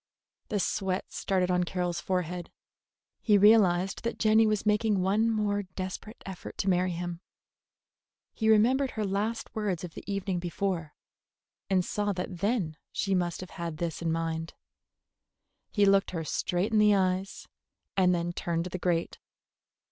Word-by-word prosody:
The 205 - 0
sweat 190 -1 -1
started 185 -2 0
on 180 0 +2
Carroll's 175 -1 -2
forehead. 180 -2 -2 0.7
He 210 -2 +4
realized 195 -3 +4
that 235 0 -2
Jenny 220 0 +4
was 215 -1 0
making 210 -2 +2
one 210 +4 +2
more 210 -2 0
desperate 190 +4 -6
effort 190 -2 -8
to 195 - 0
marry 180 +1 +2
him. 175 0 -5 1.1
He 220 -1 0
remembered 250 +6 +4
her 215 - 0
last 210 +4 -2
words 205 -6 -2
of 175 -2 -7
the - - -9
evening 195 -2 -1
before, 175 -2 -3 0.7
and 185 -2 +2
saw 205 -1 -1
that 180 -1 -5
then 200 -6 0
she 195 - -1
must 175 -2 0
have 185 - -9
had 165 -2 -3
this 170 0 -3
in 165 -1 0
mind. 165 0 -2 1.1
He 205 -2 +3
looked 195 0 +4
her 165 -3 -3
straight 180 +6 -1
in 220 - +4
the 210 -1 +6
eyes, 190 0 -1 0.5
and 185 -2 +4
then 175 0 -2
turned 170 -1 -1
to 180 - -5
the 185 - -4
grate. 170 -1 -1
190 Hz, 155 wpm, -29 LUFS, 175-210 Hz, 1.1 s, the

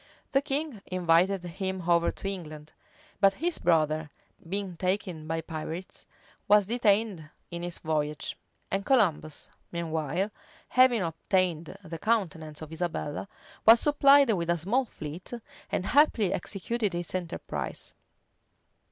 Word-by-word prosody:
The 275 - +3
king 280 -5 -2
invited 180 +1 +2
him 185 0 -4
over 170 -1 +4
to - - -6
England; 155 -6 -6 0.5
but 195 -1 +5
his 340 +3 -1
brother, 155 -2 +2 0.4
being 195 -1 -2
taken 180 -3 -2
by 165 0 -1
pirates, 160 +3 -6 0.4
was 210 -1 +6
detained 210 -6 +1 0.2
in 170 0 -4
his 175 0 -3
voyage; 150 -2 -2 0.4
and 195 +1 0
Columbus, 185 - +1 0.2
meanwhile, 170 +3 -2 0.4
having 250 -5 +5
obtained 170 0 -1
the 165 -2 -7
countenance 165 -9 -1
of 155 - -10
Isabella, 160 -1 -3 0.4
was 225 +1 +8
supplied 280 -2 +6
with 170 -3 -2
a 170 - +3
small 220 - +1
fleet, 160 -1 -8 0.4
and 185 - -1
happily 230 -8 +4
executed 210 0 -2
his 175 -1 -4
enterprise. 175 -2 -4
180 Hz, 125 wpm, -28 LUFS, 165-210 Hz, 0.5 s, was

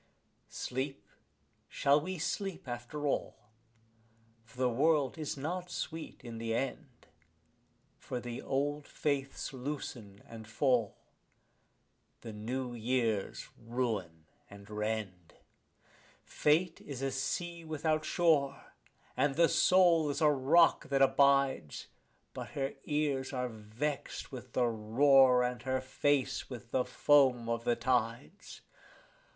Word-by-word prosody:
Sleep, 135 +2 -4 0.6
shall 140 +2 +3
we 185 +4 -4
sleep 190 +1 -3
after 120 +5 -5
all? 140 - -1 1.1
for 115 +2 -20
the 130 0 +2
world 140 +2 +2
is 155 -2 -4
not 175 +6 -4
sweet 165 -2 -6
in 115 -2 -7
the 115 0 -2
end; 135 0 -4 0.9
For 125 - -5
the 120 0 -6
old 145 +2 -2
faiths 140 -1 -2
loosen 125 -7 -6
and 110 -2 -10
fall, 120 -2 +1 1.2
the 115 - -8
new 120 +4 -4
years 115 -3 -1
ruin 110 -9 -3 0.2
and 100 0 -13
rend. 105 -5 -4 0.9
Fate 165 +3 +1
is 135 -2 -6
a 135 - 0
sea 170 +6 -3
without 155 0 -1
shore, 150 -5 +1 0.4
and 145 -2 +1
the 165 +2 +5
soul 175 -4 +4
is 140 - -2
a 150 -2 +5
rock 145 +5 +4
that 135 -1 +4
abides; 135 - +2 0.4
But - - -6
her 135 0 -1
ears 145 -3 -1
are 125 -1 -2
vexed 115 +6 -5
with - - -9
the 125 - +2
roar 125 +3 +4
and 125 -2 -2
her 130 +1 -1
face 135 +1 0
with 120 -2 -9
the 125 - +1
foam 130 -5 +3
of 115 0 -2
the 120 - +2
tides. 120 - -2
130 Hz, 120 wpm, -32 LUFS, 115-145 Hz, 1.2 s, the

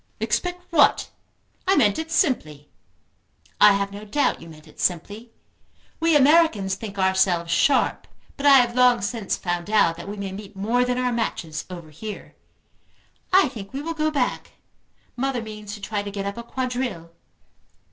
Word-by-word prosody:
"Expect 360 0 -2
what? 305 -4 +3 0.6
I 385 - +4
meant 210 -5 +3
it 320 0 -5
simply." 155 - -1 0.9
"I 210 - +8
have 200 0 -1
no 205 +1 -9
doubt 280 +8 0
you 165 - -11
meant 155 0 -15
it - - -18
simply. 205 +7 -2 0.7
We 330 -1 +3
Americans 285 - +4
think 200 0 -7
ourselves 190 -3 +1
sharp, 270 +11 +2 0.3
but 285 0 0
I 275 -1 +9
have 240 -2 +3
long 250 -3 +4
since 210 -1 -2
found 175 +1 -3
out 205 -6 +3
that 170 +3 -8
we 205 - -6
may 200 -1 -5
meet 200 +1 -9
more 225 +6 +1
than 250 0 -1
our 250 0 0
matches 175 -9 -3
over 170 -4 -9
here. 210 +8 -8 1.0
I 380 -2 +5
think 210 -1 -10
we 275 - -4
will 330 +1 -3
go 310 -1 0
back. 280 -5 -2 0.6
Mother 265 0 -1
means 210 -2 -8
to 205 - -13
try 205 0 -3
to 205 - -6
get 200 0 -5
up 200 0 -4
a 235 - -6
quadrille." 245 -8 -4
215 Hz, 170 wpm, -23 LUFS, 190-260 Hz, 1.0 s, I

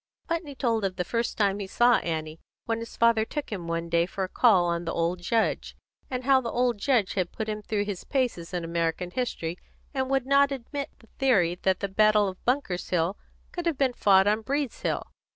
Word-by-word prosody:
Putney 330 -4 -3
told 230 -5 0
of 190 -1 -1
the 180 - -1
first 230 +5 -2
time 200 -1 +2
he 200 - -4
saw 240 +4 +4
Annie, 160 -1 -4 0.3
when 225 0 -1
his 230 - -8
father 230 -1 +4
took 290 +4 -5
him 180 -5 -5
one 165 0 -2
day 170 0 +2
for 190 - -4
a - - -1
call 190 -3 +4
on 170 0 -1
the 165 - -3
old 170 +2 -1
judge, 225 +5 0 0.3
and 255 -1 -3
how 265 0 +4
the 235 - -4
old 240 -2 0
judge 235 -5 +1 0.2
put 220 - -4
him 215 0 -3
through 210 0 -1
his 200 -3 -5
paces 245 -11 -1
in 180 -2 -3
American 170 +1 -2
history, 180 -8 -3 0.3
and 265 -1 -1
would 270 -2 +1
not 280 +1 +4
admit 275 +2 -4
the 225 - -21
theory 200 -11 +3
that 190 -1 +1
the 200 - 0
battle 210 +1 +4
of 185 -1 -7
Bunker's 245 -9 -1
Hill 175 +2 +1 0.4
could 350 -1 -4
have 325 -5 0
been 265 -3 +2
fought 195 -4 +5
on 210 +2 +2
Breed's 280 +3 -2
Hill. - - -1
215 Hz, 215 wpm, -27 LUFS, 180-255 Hz, 0.4 s, fought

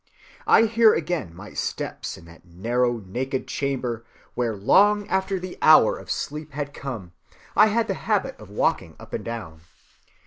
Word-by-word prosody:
I - - +7
hear 230 0 +5
again 155 - -3
my 100 +3 -11
steps - - -4
in - - -15
that 85 0 -16
narrow 120 +8 -1
naked 130 +7 -3
chamber 125 -5 -2 0.3
where 120 -3 -1
long 205 - +4
after 190 0 0
the 185 0 -8
hour 155 -8 +7
of - - -11
sleep 150 0 -4
had 145 0 -4
come 115 -12 -6 0.4
I 215 - +7
had 225 +1 +1
the - - 0 0.2
habit 210 -3 +1
of 105 -2 -12
walking 105 - -1
up - - -13
and - - -3
down. 100 -9 -7
130 Hz, 165 wpm, -24 LUFS, -, 0.4 s, I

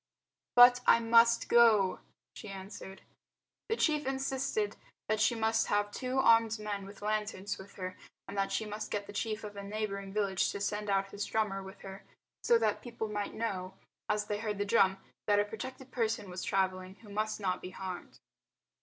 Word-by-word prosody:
"But 245 0 +8
I - - +7
must 230 0 +5
go," 215 -6 +5 0.4
she 215 - -9
answered. 195 0 -9 0.7
The 450 - +2
chief 300 - +1
insisted 270 +10 -1 0.3
that 215 0 +1
she 235 - +3
must 225 0 +1
have 205 0 +1
two 255 +3 -3
armed 230 -3 +5
men 205 -2 -4
with 205 +1 -12
lanterns 210 -2 -2
with 195 +1 -12
her, 185 -1 -6 0.3
and - - -7
that 195 -1 0
she 220 - -1
must 210 +1 -5
get 205 -1 -2
the 205 - -10
chief 215 +1 -2
of 210 -1 -7
a 200 - -6
neighbouring 200 -1 -4
village 200 -2 +1
to 200 - -4
send 210 +1 -2
out 195 0 +1
his 205 0 -3
drummer 210 -3 0
with 190 +1 -11
her 195 0 -9 0.4
so 475 - +5
that - - 0
people 235 -3 -5
might 205 -1 -3
know 190 -4 -3 0.3
as 210 0 +1
they 210 0 -2
heard 210 -2 -3
the 205 - -1
drum 195 -2 +4 0.3
that 205 -1 +4
a 205 - +2
protected 255 +5 -8
person 225 -5 -1
was 180 0 -5
travelling 185 -1 -1
who 210 - -13
must 215 +1 -2
not 185 -3 -1
be 180 - -6
harmed. 185 -1 -7
210 Hz, 190 wpm, -32 LUFS, 195-225 Hz, 0.7 s, But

